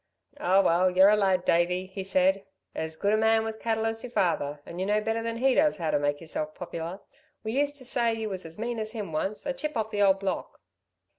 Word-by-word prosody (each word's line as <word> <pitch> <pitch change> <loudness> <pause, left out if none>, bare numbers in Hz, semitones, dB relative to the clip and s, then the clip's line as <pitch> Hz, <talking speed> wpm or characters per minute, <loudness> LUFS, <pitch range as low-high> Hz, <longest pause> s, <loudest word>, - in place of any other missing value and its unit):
"Oh 195 -9 +4
well 180 +1 +3
you're 190 +3 +6
a - - +5
lad, 190 -3 +1
Davey," 180 +2 +2
he 190 +1 -6
said. 190 +1 +2 0.3
"As 160 0 -4
good 200 +4 +1
a - - +4
man 220 0 +3
with 220 0 -5
cattle 225 -1 -1
as 225 0 -2
your 250 - -6
father, 150 -9 0
and 170 - -8
you 185 - 0
know 210 +1 +2
better 225 +1 -1
than 230 0 -3
he 260 +2 +3
does 300 +2 +3
how 165 -4 -1
to - - +2
make 145 0 0
yourself 155 -1 -5
popular. 170 +1 -6 0.4
We 220 - -3
used 285 +3 0
to 260 - -8
say 235 -2 +1
you 220 -1 -3
was 190 -2 -4
as 165 0 -10
mean 235 +1 -3
as 215 0 -4
him 210 -7 -5
once 195 - -3
a 275 - -1
chip 305 0 -4
of 220 0 -2
the 205 - -1
old 195 -1 +5
block." 195 -1 -4
200 Hz, 245 wpm, -27 LUFS, 180-225 Hz, 0.4 s, you're